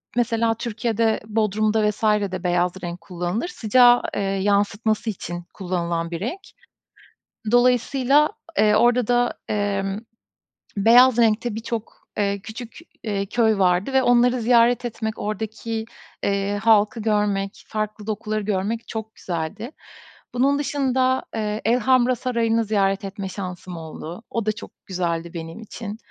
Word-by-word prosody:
mesela 230 -1 +2
Türkiye'de 225 -1 -1
Bodrum'da 215 0 +1
vs. 210 - -7
de 200 -4 +1
beyaz 175 0 +2
renk 175 0 -5
kullanılır, 180 - -3
sıcağı 245 - +5 0.4
yansıtması 205 +2 +1
için 175 -3 -5
kullanılan 170 -3 -2
bir 170 - -3
renk. 245 - -3 1.1
Dolayısıyla, 255 +4 +4 0.3
eee, 210 0 +4
orada 240 +1 +3
da, 245 0 +2 0.2
emm, 200 -1 -1 0.8
beyaz 240 +4 +6
renkte 225 0 +2
birçok, 225 0 -6
eee, 200 -1 0
küçük, 225 +2 -9 0.3
eee, 200 -3 -1
köy 220 0 +2
vardı 185 +6 +2
ve 265 - +4
onları 245 0 +4
ziyaret 240 +1 +4
etmek, 220 -2 -4
oradaki, 220 +1 -4 0.4
eee, 200 0 0
halkı 220 0 +4
görmek, 205 -2 0
farklı 215 0 -4
dokuları 215 0 -2
görmek 210 +3 -2
çok 220 0 -6
güzeldi. 175 - -4 0.6
Bunun 275 +3 +2
dışında, 260 -2 +1
eee, 215 -1 -2
Elhamra 250 +2 +3
Sarayı'nı 230 -2 0
ziyaret 195 -2 +1
etme 195 -1 -5
şansım 180 -2 -6
oldu. 165 +5 -8
O 230 -2 -2
da 215 - +2
çok 215 - -10
güzeldi 170 -2 -2
benim 165 +5 -7
için. 215 -1 -7
215 Hz, 125 wpm, -23 LUFS, 195-235 Hz, 1.1 s, beyaz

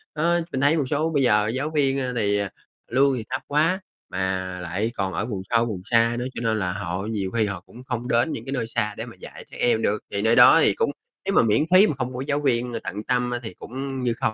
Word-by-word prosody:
Đó, 170 +3 +2
mình 130 - -2
thấy 145 +3 +4
một 145 - +1
số 155 +2 +1
bây 145 -4 +1
giờ 105 -4 +3
giáo 130 +7 -1
viên, 135 -2 +2
a, 130 -2 -1
thì, 100 -3 +1
à, 100 -1 -2 0.4
lương 135 +3 +4
thì 115 - -4
thấp 130 +1 -2
quá 160 +6 +2 0.3
mà 95 -1 -2
lại 95 +6 -2
còn 95 -1 -2
ở - - -1
vùng 105 -5 -4
sâu 115 0 +3
vùng 105 -6 -4
xa 115 0 +3
nữa, 125 - -3
cho - - -4
nên 110 -2 0
là 90 -2 -1
họ 95 -1 -4
nhiều 100 -4 -3
khi 115 -2 +1
họ 100 -4 -4
cũng 125 - -13
không 120 -2 -4
đến 120 +6 +2
những 115 - -5
cái 135 - -5
nơi 125 -5 -2
xa 105 -2 -1
để - - -4
mà - - -11
dạy - - -11
trẻ - - -10
em 115 -2 +2
được, 105 0 +1
thì 100 - -1
nơi 110 +2 +3
đó - - +8
thì - - +4
cũng - - 0 0.3
nếu - - 0
mà - - +6
miễn 110 +3 +3
phí 190 +3 +7
mà - - 0
không 130 -1 -3
có 125 - -4
giáo 145 0 +1
viên 125 -3 +1
tận 105 +3 -5
tâm 125 0 0
á 120 - -2
thì 110 - -6
cũng 135 +1 -5
như 120 -2 +1
không. 110 - +1
120 Hz, 275 wpm, -24 LUFS, 105-135 Hz, 0.4 s, đó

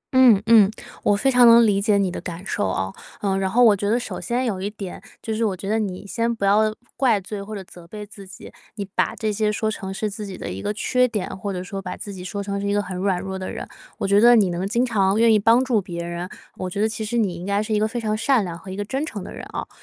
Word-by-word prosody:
嗯 245 -6 +7
嗯， 220 -4 +7 0.3
我 205 - +3
非 270 +6 +2
常 245 -1 +7
能 230 0 +8
理 200 -2 +2
解 205 -1 +3
你 190 -2 +1
的 - - -6
感 175 +2 -7
受 95 - -1
啊。 95 +1 -2 0.3
呃， 195 -2 0
然 190 -1 0
后 245 +5 +4
我 215 -3 +7
觉 205 +1 -2
得 235 +3 +2
首 - - -6
先 250 +2 -1
有 195 -5 -2
一 200 - -2
点， 200 -3 -8 0.2
就 220 - -2
是 225 +1 -1
我 195 -4 0
觉 195 - -7
得 220 +2 +1
你 200 -2 -4
先 230 +3 -1
不 200 -3 -2
要 215 +2 +3 0.2
怪 235 -6 +3
罪 200 +1 -6
或 215 +2 -7
者 195 - -6
责 175 -1 -15
备 210 +2 -8
自 200 -2 -13
己， 185 - -12 0.2
你 200 -2 -4
把 - - 0
这 215 -2 -2
些 210 0 +1
说 220 +1 -1
成 190 -2 -6
是 210 +2 -2
自 210 +1 -6
己 190 - -7
的 - - -6
一 95 +1 -6
个 - - -2
缺 250 +3 +2
点， 210 -5 -3
或 200 +1 -3
者 180 -1 -4
说 195 +1 -6
把 180 -1 -6
自 200 - -7
己 180 -1 -8
说 200 +2 -4
成 200 0 -3
是 200 - -2
一 200 - +1
个 - - +2
很 185 -1 -6
软 185 -1 0
弱 190 0 -5
的 185 - -5
人， - - -6 0.3
我 - - -2
觉 200 +1 +4
得 240 +1 +8
你 195 -5 +3
能 180 +3 -2
经 240 +4 +1
常 205 -3 +2
愿 230 -1 +5
意 215 - +4
帮 230 +5 +4
助 230 -5 +2
别 170 -2 -6
人， 175 +1 -5 0.3
我 185 -1 -4
觉 200 - -5
得 215 - +3
其 220 0 -4
实 230 +3 -2
你 205 -6 +1
应 170 +1 -8
该 200 +1 0
是 215 0 -3
一 210 - +2
个 215 - +2
非 240 +2 -4
常 215 -2 -1
善 235 -2 +2
良 170 - -5
和 190 +3 -11
一 190 - -5
个 205 0 -3
真 270 +6 -2
诚 205 -11 -5
的 - - -8
人 - - -8
哦， - - -4
205 Hz, 325 characters per minute, -22 LUFS, 190-220 Hz, 0.3 s, 能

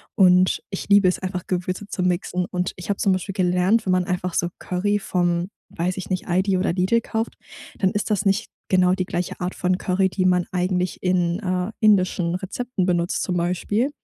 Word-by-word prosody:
und 185 -2 +4
ich 195 - -6
liebe 200 -2 +6
es 180 - +1
einfach, 185 -1 -4
Gewürze 185 +2 -2
zu 190 -2 -3
mixen. 180 0 0
Und 180 0 -2
ich 180 - -9
hab 200 - 0
zum 195 - +3
Beispiel 185 +1 -3
gelernt, 185 +4 +2
wenn 185 - +1
man 185 0 +3
einfach 180 0 -2
so 175 - 0
Curry 205 +3 0
vom 175 -2 0 0.2
weiß 175 +2 -1
ich 190 - -6
nicht, 185 -1 -2
ALDI 185 +2 +2
oder 185 - 0
Lidl 185 +6 +2
kauft, 225 0 -3 0.4
dann 190 -2 +2
ist 210 +1 -2
das 205 0 +1
nicht 195 +3 +1 0.2
genau 185 -1 +4
die 185 0 0
gleiche 180 -1 -3
Art 180 +1 -3
von 180 0 0
Curry, 190 +1 +1
die 185 0 -1
man 180 -1 +3
eigentlich 180 0 -1
in, 180 -1 +1
äh, 185 -1 -2
indischen 185 -5 +3
Rezepten 200 +2 -3
benutzt 175 -1 0
zum 180 - -1
Beispiel, 185 +8 0
185 Hz, 200 wpm, -23 LUFS, 180-195 Hz, 0.4 s, liebe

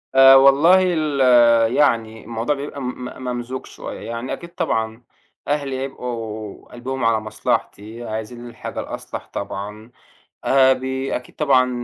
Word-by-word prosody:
آآ، 135 0 +9
والله 140 +7 +6
ال 155 -4 0 0.5
يعني 115 -6 +1
الموضوع 115 +5 -2
بيبقى 140 0 -6
م - - -4 0.2
م 130 - -9
ممزوج 125 +1 -4
شوية، - - -8
يعني 115 +2 -5
أكيد 170 - -8
طبعًا 110 +1 -2 0.4
أهلي 140 -2 -1
هيبقوا 115 -6 -6
قلبهم 130 +1 -4
على 115 -1 +3
مصلحتي، 110 +1 -3
عايزين 110 +2 -6
الحاجة 115 - -7
الأصلح - - -7
طبعًا 105 +3 -6 0.5
آآ، 135 -1 +5
بي 130 +1 -2
أكيد 125 - -9
طبعًا 130 -4 +3
125 Hz, 130 wpm, -21 LUFS, 110-135 Hz, 0.5 s, آآ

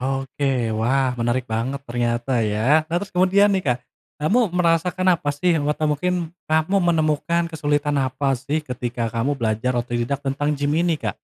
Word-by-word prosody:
Oke. 135 -2 -1
Wah 130 +3 +2
menarik 120 +2 0
banget 125 +5 -2
ternyata 120 0 -1
ya. 115 +9 +2
Nah, 165 - -4
terus 205 - -7
kemudian 190 +3 +4
nih, 190 -2 +1
Kak, 125 -2 +2 0.4
kamu 230 +10 +3
merasakan 180 +1 +1
apa 145 - -1
sih? 165 +3 +1
Wata 150 +1 0
mungkin 175 +2 -1 0.2
kamu 160 +5 +1
menemukan 170 -1 +1
kesulitan 145 -2 0
apa 135 +1 0
sih 145 +4 -2
ketika 120 -3 -3
kamu 115 +6 0
belajar 120 0 -1
otodidak 120 +3 -2
tentang 145 +2 -1
gim 145 0 -1
ini, 170 -1 +2
Kak? 110 - -4
145 Hz, 160 wpm, -22 LUFS, 125-165 Hz, 0.4 s, kemudian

